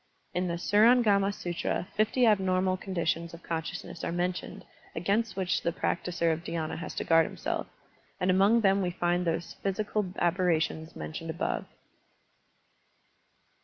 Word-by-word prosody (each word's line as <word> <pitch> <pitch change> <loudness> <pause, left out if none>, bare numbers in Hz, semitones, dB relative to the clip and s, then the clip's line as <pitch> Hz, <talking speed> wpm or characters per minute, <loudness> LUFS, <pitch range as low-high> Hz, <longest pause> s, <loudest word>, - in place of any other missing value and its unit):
In 180 +1 0
the 170 - -1
QUrang&ma 205 +1 +4
SUtra 175 -2 -3
fifty 220 +4 +3
abnormal 190 -3 +3
conditions 170 -3 -2
of 170 - -15
consciousness 165 0 -5
are - - -1
mentioned 175 +1 -3 0.3
against 200 +6 0
which 185 -2 0
the 170 - 0
practiser 170 0 0
of 165 +1 -5
dhyAna 160 -2 -3
has 170 - -6
to - - -2
guard 165 -1 +4
himself, - - -3 0.5
and 185 +1 +2
among 200 +5 +4
them 195 -1 +3
we 180 - 0
find 175 0 0
those 165 0 -2
psychical 205 0 -1
aberrations 170 -2 0
mentioned 165 +1 -6
above. 165 +3 -2
180 Hz, 135 wpm, -29 LUFS, 170-195 Hz, 0.5 s, QUrang&ma